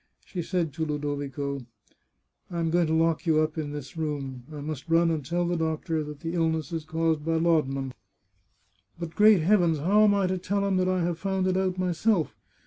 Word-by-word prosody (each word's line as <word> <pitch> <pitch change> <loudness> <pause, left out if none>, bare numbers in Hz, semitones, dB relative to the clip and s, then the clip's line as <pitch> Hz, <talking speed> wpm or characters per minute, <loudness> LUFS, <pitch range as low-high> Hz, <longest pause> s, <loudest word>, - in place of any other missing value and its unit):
She 180 - -4
said 170 -3 -1
to 160 - -3
Ludovico: 145 -2 -3 0.5
" - - -48
I 175 -2 -4
am 165 -1 0
going 175 -1 +3
to 160 - 0
lock 165 +1 +1
you 155 -1 +4
up 155 0 0
in 155 -3 -3
this 145 0 -7
room. 140 -5 -4
I 150 - -7
must 150 +1 -6
run 165 0 +4
and 155 -3 -2
tell 175 +6 -1
the 175 +1 0
doctor 160 -1 -1
that 150 -1 -9
the 165 +1 -3
illness 160 -1 0
is 160 -2 -3
caused 160 -1 0
by 165 +1 0
laudanum. 145 -5 +1 1.0
But, 170 -1 -6
great 210 -3 +6
heavens! 175 -2 +3
how 200 +8 +4
am 205 -1 +4
I 200 -1 +2
to 185 0 -1
tell 200 +2 -1
him 195 -1 +1
that 185 0 +2
I 185 -1 +1
have 170 -1 -1
found 190 0 -1
it 185 0 +1
out 185 -1 0
myself! 180 0 +1
165 Hz, 215 wpm, -27 LUFS, 150-180 Hz, 1.0 s, great